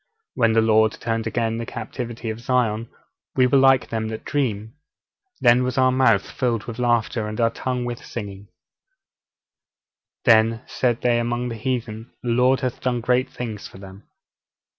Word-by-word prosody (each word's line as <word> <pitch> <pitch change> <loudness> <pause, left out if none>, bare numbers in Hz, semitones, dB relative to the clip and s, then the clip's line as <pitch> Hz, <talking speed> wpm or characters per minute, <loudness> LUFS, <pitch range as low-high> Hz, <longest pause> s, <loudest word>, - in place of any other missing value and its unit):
'_When 115 -3 +2
the 115 - +5
Lord 110 0 +4
turned 115 -1 -3
again 115 0 -1
the 115 - -4
captivity 115 0 -5
of 110 - -7
Zion, 115 -2 0 0.5
we 130 - +4
were 135 +2 +4
like 135 -1 +4
them 110 -1 -2
that 110 0 -6
dream. 110 -7 -2 0.7
Then 120 +1 +5
was 125 +1 -2
our 130 0 +4
mouth 125 -6 +3
filled 120 -4 -1
with 115 0 -8
laughter, 120 -2 +1
and 110 +1 -6
our 115 -1 +3
tongue 125 +1 -3
with 120 -1 -5
singing: 100 -3 -7 1.8
then 115 -1 +4
said 120 -2 -1
they 120 -1 +2
among 120 +1 -2
the 115 - -5
heathen, 115 -1 -4
The 120 - -3
Lord 125 +2 +3
hath 130 -2 -3
done 125 -1 0
great 125 +2 +1
things 110 -4 -6
for - - -14
them. 95 +1 -13
115 Hz, 165 wpm, -22 LUFS, 110-125 Hz, 1.8 s, the